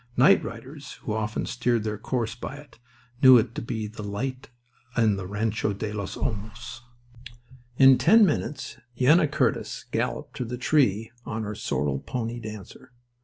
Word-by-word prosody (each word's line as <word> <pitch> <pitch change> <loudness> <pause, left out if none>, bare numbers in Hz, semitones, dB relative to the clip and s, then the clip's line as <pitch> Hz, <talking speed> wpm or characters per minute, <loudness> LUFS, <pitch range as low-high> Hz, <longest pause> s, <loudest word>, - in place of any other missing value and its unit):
Night - - +6
riders, - - -8
who 105 - -2
often 110 0 -2
steered 120 -3 0
their 105 -1 -3
course 115 -4 -2
by 125 +3 -7
it, 145 -4 -15 0.4
knew 130 -2 +9
it 115 0 +1
to - - -4
be 115 -2 -4
the 105 +1 -8
light 125 +6 -4 0.5
in 110 -3 +4
the 95 -2 -5
Rancho 105 +1 -1
de 105 +1 -4
los 100 -2 -5
Olmos. 110 -2 -5 1.0
In 135 -1 +7
ten 215 +5 +6
minutes 150 -3 -2 0.2
Yenna 150 +5 +5
Curtis 145 -4 -1
galloped - - -2
to - - -2
the 125 +1 -5
tree 115 -5 +2
on 110 -1 -4
her 105 0 -4
sorrel 75 -8 -2
pony 120 - -4
Dancer. 110 +3 -10
115 Hz, 160 wpm, -26 LUFS, 105-130 Hz, 1.0 s, knew